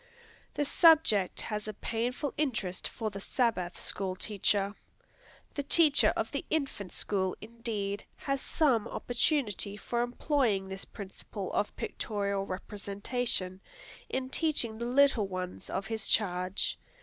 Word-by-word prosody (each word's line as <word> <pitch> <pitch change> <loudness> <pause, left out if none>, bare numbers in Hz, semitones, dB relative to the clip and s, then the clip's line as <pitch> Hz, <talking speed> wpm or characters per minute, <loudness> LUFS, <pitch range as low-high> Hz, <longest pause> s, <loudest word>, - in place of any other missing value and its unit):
The 290 - +1
subject 305 - +5
has 210 -1 -3
a 215 - -4
painful 245 +7 -2
interest 225 -11 -1
for 220 -2 -4
the 200 - -6
Sabbath 195 -5 0
School 190 -1 -1
Teacher. 200 0 +1 0.8
The 285 - -1
teacher 295 +1 +5
of - - -1
the - - -2
infant 275 - -2
school, 190 -2 -1
indeed, 215 -3 -3
has 275 -1 -2
some 255 -9 +2
opportunity 235 - 0
for 235 +3 -1
employing 245 -5 +1
this 190 0 -6
principle 200 0 -7
of 205 - 0
pictorial 200 -2 -2
representation, 200 0 -2 0.5
in 260 0 -2
teaching 260 -10 +1
the 235 - -2
little 255 -5 +4
ones 185 -1 -5
of 195 - -2
his 220 -1 -2
charge. 185 -2 +1
215 Hz, 125 wpm, -31 LUFS, 195-250 Hz, 0.8 s, subject